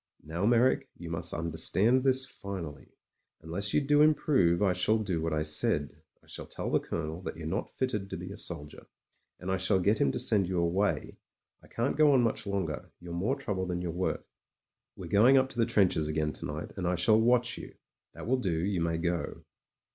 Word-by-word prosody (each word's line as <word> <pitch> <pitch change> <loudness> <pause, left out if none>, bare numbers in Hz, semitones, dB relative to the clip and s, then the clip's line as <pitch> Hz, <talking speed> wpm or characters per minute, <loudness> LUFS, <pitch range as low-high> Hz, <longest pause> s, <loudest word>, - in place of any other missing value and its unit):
Now, 85 +6 -2
Meyrick, 120 +2 +3
you - - -8
must - - -2
understand 100 +9 +1
this 130 -1 +2
finally. 95 - -7 0.6
Unless 95 +5 -3
you - - +3
do 145 +1 +3
improve, 135 - +3
I 95 -2 +3
shall 90 +5 +2
do 95 -7 -2
what 80 0 -1
I 75 0 0
said. 75 -1 +1 0.2
I - - -23
shall - - -8
tell - - -5
tht - - +2
Colonel 80 +1 -4
that 90 - -6
you're 80 - -7
not 95 +6 -2
fitted 105 -7 -2
to 95 - -5
be 90 +2 -7
a 100 - -8
soldier, 75 -4 -7 0.5
and 90 +1 -4
I 95 - +1
shall 95 +1 +2
get 100 +4 +2
him 70 - +3
to - - -3
send 100 -4 +2
you 90 0 -2
away. 85 -2 0 0.4
I - - -18
can't 120 +4 -2
go 150 -2 +6
on 130 - +5
much 115 -3 -1
longer; 95 -7 -3
you're 85 -1 -8
more 100 +10 0
trouble 100 -10 -3
than 90 -1 -2
you're 85 - -2
worth. 90 +2 -2 0.7
We're - - -8
going 120 +7 +5
up 130 0 +3
to 120 - -7
the 115 - +3
trenches 95 -9 +2
again 75 0 -1
to - - -6
night, - - -6
and 90 -2 -2
I 90 - +1
shall 110 +6 +4
watch 120 +1 +2
you. - - -10 0.4
That - - -8
will 130 +3 +2
do; 95 -10 -1
you 90 0 -1
may 85 0 0
go." 85 0 -3
95 Hz, 215 wpm, -30 LUFS, 85-115 Hz, 0.7 s, go